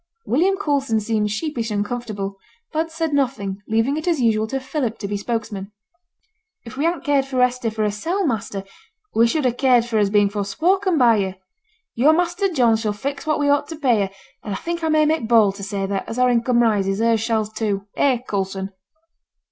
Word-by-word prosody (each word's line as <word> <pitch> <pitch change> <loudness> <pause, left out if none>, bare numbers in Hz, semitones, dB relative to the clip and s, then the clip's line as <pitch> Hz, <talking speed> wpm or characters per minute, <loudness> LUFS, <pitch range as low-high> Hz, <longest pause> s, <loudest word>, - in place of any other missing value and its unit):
William 365 +10 +2
Coulson 280 - 0
seemed 215 -1 0
sheepish 235 0 -3
and 205 -1 0
uncomfortable, 205 -3 -4 0.3
but 320 +1 -1
said 320 -1 -2
nothing, 230 -8 -1
leaving 225 +6 +1
it 315 - -5
as 335 -4 +2
usual 220 -3 +2
to 270 +4 -2
Philip 260 -3 -3
to 200 - -5
be 205 - -3
spokesman. 205 -2 -4 0.9
'If 235 +2 -9
we 285 +4 -1
hadn't 340 0 0
cared 285 -3 +2
for 265 -2 -3
Hester 250 -1 +2
for 215 0 -2
hersel', 325 - -1
master, 215 -6 -2 0.5
we 230 +1 +4
should 295 +4 0
ha' 245 -1 +1
cared 250 -2 +4
for 235 -2 -1
her - - +4
as 205 -1 +2
being 205 0 +4
forespoken 335 - +1
by 235 -4 +5
yo'. 190 -2 -1 0.6
Yo' 255 +6 +3
and 315 - +5
Master 355 +3 0
John 240 -8 +3
shall 215 -2 -2
fix 280 +8 -5
what 305 - +1
we 290 - +1
ought 285 0 +2
t' 320 - -6
pay 250 -7 +2
her; - - -15 0.3
and 205 -3 -4
I - - -3
think 340 - -4
I 320 - +1
may 310 0 +4
make 310 -6 0
bold 220 -4 +5
to 200 - -8
say 200 -1 -2
that, 195 0 -3
as 225 - -5
our 250 0 +4
income 240 0 +2
rises, 195 -4 +1
hers 225 0 +2
shall 225 -1 0
too 210 -2 -3
eh, 265 -3 +3
Coulson?' 195 -1 -3
235 Hz, 210 wpm, -21 LUFS, 210-290 Hz, 0.9 s, by